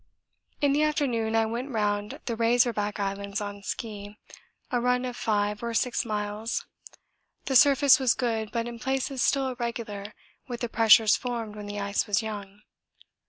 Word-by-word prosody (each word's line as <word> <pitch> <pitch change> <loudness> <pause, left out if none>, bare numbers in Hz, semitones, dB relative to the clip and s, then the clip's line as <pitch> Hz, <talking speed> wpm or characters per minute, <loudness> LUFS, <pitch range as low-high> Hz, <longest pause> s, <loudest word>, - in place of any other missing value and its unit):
In 285 -1 +3
the 295 - +2
afternoon 255 -8 0
I 225 0 +3
went 235 +5 -4
round 205 -3 -2
the 235 - -2
Razor 240 +1 +3
Back 210 0 -3
Islands 200 +1 -3
on 205 -1 -6
ski, 205 0 -6 0.5
a 245 -1 +1
run 250 +1 +1
of 250 -1 -4
5 210 -2 0
or 235 -1 -3
6 245 +1 0
miles; 210 +1 -3 0.8
the 265 - -1
surface 280 +1 +6
was 260 -3 +3
good 225 -3 -1
but 235 -1 -2
in 235 -1 -7
places 265 +1 -2
still 270 -1 +2
irregular 235 -4 -5 0.3
with 240 -2 -6
the 240 - -2
pressures 220 -1 +6
formed 230 -4 -4
when 210 -1 -7
the 205 0 -5
ice 200 0 -1
was 210 +2 +1
'young.' 205 -2 -7
225 Hz, 165 wpm, -27 LUFS, 210-245 Hz, 0.8 s, surface